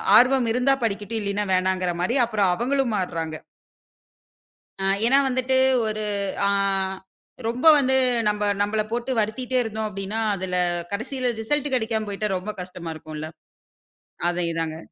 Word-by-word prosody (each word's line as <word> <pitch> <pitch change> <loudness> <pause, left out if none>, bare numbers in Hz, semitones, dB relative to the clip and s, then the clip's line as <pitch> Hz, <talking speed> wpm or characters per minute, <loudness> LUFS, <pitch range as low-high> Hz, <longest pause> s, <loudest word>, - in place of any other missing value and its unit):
ஆர்வம் 255 -1 +5
இருந்தா 250 +3 +3
படிக்கட்டும், 210 0 -2
இல்லீன்னா 205 0 -1
வேணாங்கற 185 -1 +1
மாரி 210 +8 0
அப்புறம் 210 -5 +1
அவங்களும் 255 +2 0
மாறுறாங்க. 165 -4 -3 1.4
ஆ - - -2 0.2
ஏனா, 265 +4 +5
வந்துட்டு 260 +1 +1 0.3
ஒரு 215 0 -3 0.4
அ - - +3 1.0
ரொம்ப 245 +7 +1
வந்து 265 -2 +3 0.3
நம்ப 210 0 0 0.2
நம்மள 210 +1 +1
போட்டு 240 +2 -2
வருத்திட்டே 240 +4 -1
இருந்தோம் 220 -1 -3
அப்டின்னா, 195 +2 -4 0.2
அதில 185 -1 -3 0.4
கடைசியில 250 +4 -2
ரிசல்ட் 290 +4 -1
கிடைக்காம 220 -2 -1
போயிட்டா 210 +1 -2
ரொம்ப 205 +4 -5
கஷ்டமா 180 -2 -7
இருக்கும் 155 0 -9
இல்ல? 155 +1 -5 1.0
அதேதாங்க. 165 -2 -2
215 Hz, 130 wpm, -24 LUFS, 185-245 Hz, 1.4 s, ஆர்வம்